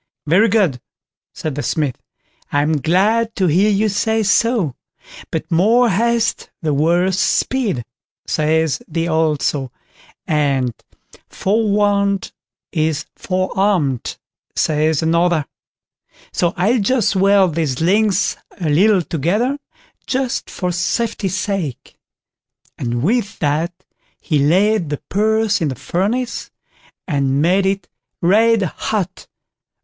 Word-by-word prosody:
"Very 190 +9 +4
good", 185 - +1 0.5
said 155 - -5
the 145 - -3
Smith; 145 -4 -2 0.5
"I'm 150 +2 +1
glad 215 - +2
to 190 - +1
hear 180 +6 +3
you 210 +1 +2
say 215 +2 0
so, 205 - +2 0.6
but - - -4
'more 225 +8 +4
haste 230 +4 0
the 155 -3 -1
worse 175 +6 +2
speed', 210 - 0 0.4
says 160 0 +1
the 165 +1 -2
old 160 -3 +1
saw, 135 -3 0 0.6
and 140 -5 +1 0.6
'forewarned 200 -1 +1 0.4
is 155 -2 -1
forearmed', 185 - -1 0.4
says 155 0 +1
another; 170 -1 +2 0.9
so 175 -1 0
I'll 215 +8 +2
just 220 -1 +1
weld 195 -2 +4
these 150 -5 -1
links 200 +3 +2 0.2
a 160 -4 -1
little 190 +4 +4
together, 205 - -1 0.5
just 260 -1 -2
for 180 -2 -3
safety's 195 +2 -1
sake"; 195 -11 -4 0.8
and 120 0 -3
with 215 +4 0
that 160 +4 -2 0.3
he 150 -3 0
laid 180 +4 +2
the 145 - -2
purse 220 0 +1
in 160 - +1
the 135 - -3
furnace, 220 - -2 0.6
and 140 -4 0
made 185 +5 +3
it 195 -1 -2 0.3
red 220 +4 +3
hot. 190 +2 -3
185 Hz, 115 wpm, -18 LUFS, 155-210 Hz, 0.9 s, Very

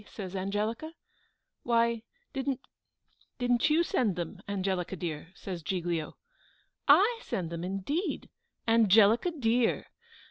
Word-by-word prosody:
says 195 -3 -7
Angelica. 215 - -2 0.7
"Why, 235 -1 +2 0.3
didn't 270 -1 -2 0.8
didn't 245 +2 +2
you 320 +3 +4
send 225 - +1
them, 180 +2 -5
Angelica 190 -2 -1
dear?" 165 -1 -5
says 180 -3 -6
Giglio. 170 -2 -2 0.7
"I 400 +11 +6
send 170 -3 -3
them 170 0 -4
indeed! 195 - -2 0.4
Angelica 225 - +5
dear! 245 -7 +1
215 Hz, 105 wpm, -30 LUFS, 185-250 Hz, 0.8 s, I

